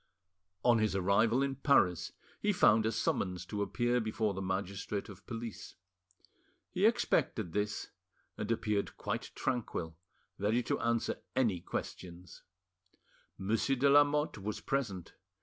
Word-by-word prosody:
On 120 -2 +5
his 110 -2 +1
arrival 110 +7 +3
in 135 -1 -2
Paris 90 - +3 0.3
he 210 - +2
found 110 - +4
a - - +1
summons 95 -4 -1
to 105 +2 -4
appear 120 +3 +1
before 110 -2 -1
the 95 - -4
magistrate 100 +2 -3
of 100 - -13
police. 115 -1 -6 1.0
He - - +4
expected 85 - +1
this, 105 0 -2 0.4
and 105 0 -4
appeared 105 -3 -1
quite - - -3
tranquil, 85 -9 -2 0.4
ready 110 +5 +1
to - - -1
answer 115 -1 0 0.2
any 115 -9 +2
questions. 90 0 -7 1.0
Monsieur 115 +7 +1
de 140 +2 +3
Lamotte 145 -2 +4
was 105 +2 -4
present. 100 -11 -2
110 Hz, 130 wpm, -33 LUFS, 95-120 Hz, 1.0 s, On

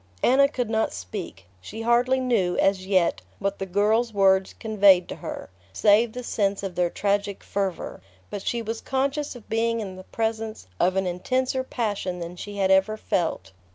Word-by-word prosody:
Anna 275 +3 +5
could 245 -5 -3
not 220 0 +1
speak. 95 0 -7 0.2
She 220 - -7
hardly 245 +3 +3
knew, 225 -9 +1
as 190 -1 +1
yet, 185 - +2 0.2
what 200 0 -2
the 195 - -3
girl's 215 +5 +2
words 190 -2 +3
conveyed 200 -5 +5
to - - -6
her, - - -7 0.2
save 215 - +4
the 250 - -6
sense 200 -4 -1
of 195 -2 -4
their 175 -1 +1
tragic 200 +1 -1
fervour; 195 - -3 0.3
but 205 - -4
she 235 +3 -2
was 225 +1 -4
conscious 275 +2 -1
of 240 - -12
being 230 +1 0
in 190 -4 -6
the 185 - -9
presence 225 - -3
of 185 +1 +2
an 190 0 +1
intenser 255 +9 -1
passion 205 -8 -2
than 170 0 -6
she 205 +3 -8
had 190 -1 +2
ever 190 +3 +3
felt. 165 - -2
205 Hz, 180 wpm, -25 LUFS, 190-230 Hz, 0.3 s, Anna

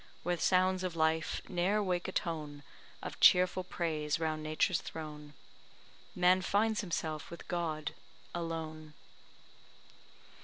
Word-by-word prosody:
Where 175 +1 +1
sounds 185 0 +3
of 180 -2 -2
life 160 -1 +1
ne'er 195 +4 +1
wake 180 -2 -1
a - - -3
tone 150 -5 -3 0.4
Of - - -6
cheerful 185 0 +6
praise 155 -4 -1
round 155 -1 -1
Nature's 155 +4 +1
throne, 150 -2 -8 0.8
Man 180 +1 +5
finds 210 +3 +2
himself 160 -5 -3
with 170 - -10
God 160 -4 -2 0.4
alone. 160 -2 -5
165 Hz, 115 wpm, -33 LUFS, 155-185 Hz, 0.8 s, cheerful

